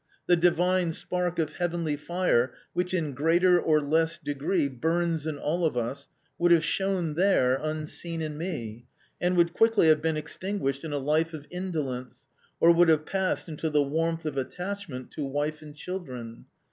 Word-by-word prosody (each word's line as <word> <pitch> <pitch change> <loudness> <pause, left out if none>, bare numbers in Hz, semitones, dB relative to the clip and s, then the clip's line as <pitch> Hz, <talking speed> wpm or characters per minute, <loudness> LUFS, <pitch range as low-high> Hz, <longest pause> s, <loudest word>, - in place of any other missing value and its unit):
The 175 - +5
divine 175 0 +2
spark 180 +1 -2
of 155 -2 -2
heavenly 170 -3 -1
fire 150 -6 0 0.2
which 180 +1 -1
in 160 -6 -1
greater 175 +6 +4
or 155 -1 +3
less 160 +3 +1
degree 150 +2 -1
burns 160 +4 -1
in 155 -2 -3
all 160 +5 -1
of 155 -6 +1
us, 130 +4 -3 0.3
would 175 0 +3
have 165 -1 +6
shone 190 -5 0
there 165 -7 +3
unseen 155 +2 -3
in 155 -1 -4
me, 120 - -5 0.3
and 180 0 +1
would 170 0 +3
quickly 225 -6 +4
have 155 -1 +5
been 160 0 0
extinguished 155 -2 -3
in 160 - -5
a 145 - -1
life 155 +4 0
of 150 -2 -9
indolence, 145 -9 -4 0.3
or 170 - +7
would 170 0 +5
have 155 -1 +3
passed 190 -1 -1
into 160 0 -3
the 150 -1 +3
warmth 165 +3 -1
of 150 -3 -3
attachment 180 -1 -5
to 150 - -4
wife 145 +2 -2
and 150 -1 -11
children. 130 -10 -7
160 Hz, 170 wpm, -27 LUFS, 145-175 Hz, 0.3 s, or